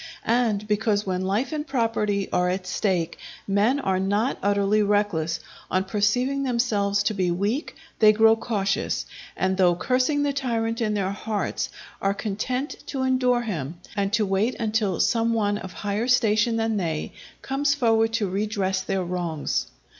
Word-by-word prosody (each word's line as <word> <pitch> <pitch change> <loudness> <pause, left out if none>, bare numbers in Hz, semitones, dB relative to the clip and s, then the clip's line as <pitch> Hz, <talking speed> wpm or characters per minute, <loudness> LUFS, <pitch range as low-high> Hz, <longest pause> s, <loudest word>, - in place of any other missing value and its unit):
And 225 -3 +1
because 210 0 +1
when 185 -1 -1
life 210 +10 0
and 305 -1 -3
property 225 -6 0
are 180 0 +2
at 185 +1 -2
stake 180 -2 -1 0.3
men 210 +8 +2
are 190 -7 0
not 205 +7 0
utterly 200 +1 +2
reckless, 205 -6 +1 0.3
on 185 0 +1
perceiving 230 +8 +1
themselves 215 -6 +1
to 215 - 0
be 185 -3 0
weak 205 - -1 0.2
they 215 -1 +8
grow 220 +1 +5
cautious, 205 -4 -1 0.3
and 190 0 0
though 180 -2 +4
cursing 255 - +1
the 285 -1 0
tyrant 230 -4 -1
in 215 -2 0
their 195 -2 0
hearts, 210 +1 -2 0.3
are 195 0 +1
content 250 +7 -3
to 270 -2 -2
endure 255 -2 +2
him, 170 - -4 0.2
and 200 -1 0
to 220 -1 +3
wait 200 +5 +1
until 215 -4 0
some 230 -1 +2
one 205 -2 +1
of 190 -2 -8
higher 205 +5 -2
station 230 -2 +3
than 225 -1 0
they, 160 -5 -2 0.3
comes 280 +1 +1
forward 225 -4 +2
to 220 -3 +1
redress 195 -1 -1
their 190 0 -1
wrongs. 175 -3 -2
210 Hz, 160 wpm, -24 LUFS, 195-230 Hz, 0.3 s, they